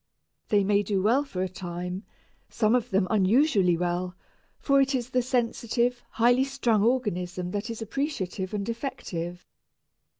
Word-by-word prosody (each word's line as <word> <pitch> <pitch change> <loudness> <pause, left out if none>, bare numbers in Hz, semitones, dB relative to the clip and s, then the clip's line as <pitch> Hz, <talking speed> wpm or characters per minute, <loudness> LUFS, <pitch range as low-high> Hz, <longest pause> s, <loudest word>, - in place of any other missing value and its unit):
They 205 -2 +4
may 205 +1 +3
do 200 -1 -1
well 245 +7 +3
for 185 -10 -4
a - - 0
time, 180 +1 -6 0.4
some 215 0 +2
of 245 -2 +1
them 190 -1 +2
unusually 205 - +3
well, 180 +1 -2 0.4
for 275 -1 +3
it 270 0 +1
is 250 0 -3
the 255 - +2
sensitive, 245 0 0
high 245 +3 +3
strung 265 -6 +1
organism 180 -7 0
that 205 +4 -3
is 230 -1 -4
appreciative 210 - -3
and 200 -2 -3
effective. 180 -8 -5
215 Hz, 145 wpm, -27 LUFS, 185-245 Hz, 0.4 s, They